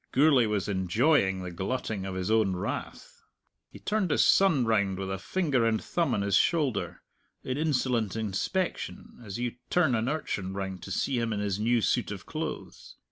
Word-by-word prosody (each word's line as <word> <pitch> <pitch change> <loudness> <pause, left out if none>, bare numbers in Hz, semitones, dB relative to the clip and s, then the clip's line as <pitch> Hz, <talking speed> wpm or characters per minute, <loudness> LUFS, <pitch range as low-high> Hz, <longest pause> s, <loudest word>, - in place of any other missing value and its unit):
Gourlay 135 -4 +5
was 105 -2 -1
enjoying 95 - +2
the 90 - -5
glutting 95 +1 -3
of 95 - -5
his 95 +2 -2
own 110 -4 +3
wrath. 90 - -5 0.5
He - - -12
turned 210 -4 -1
his 145 - +3
son 165 -10 +4
round 100 -4 +1
with 95 0 -4
a 95 - -3
finger 145 - 0
and 115 -1 +2
thumb 170 -2 0
on 100 - 0
his 100 -1 +1
shoulder, 150 -4 +1 0.4
in 130 - -2
insolent 125 - 0
inspection, 110 - -3
as 100 -2 -6
you 120 0 -3
turn 165 -7 +3
an 115 +2 0
urchin 100 -11 -3
round 95 -2 -4
to 95 - -8
see 125 +6 0
him 115 -1 -1
in 105 - -1
his 100 -1 -1
new 115 +2 +2
suit - - +1
of - - -7
clothes. - - -6
110 Hz, 185 wpm, -28 LUFS, 95-135 Hz, 0.5 s, Gourlay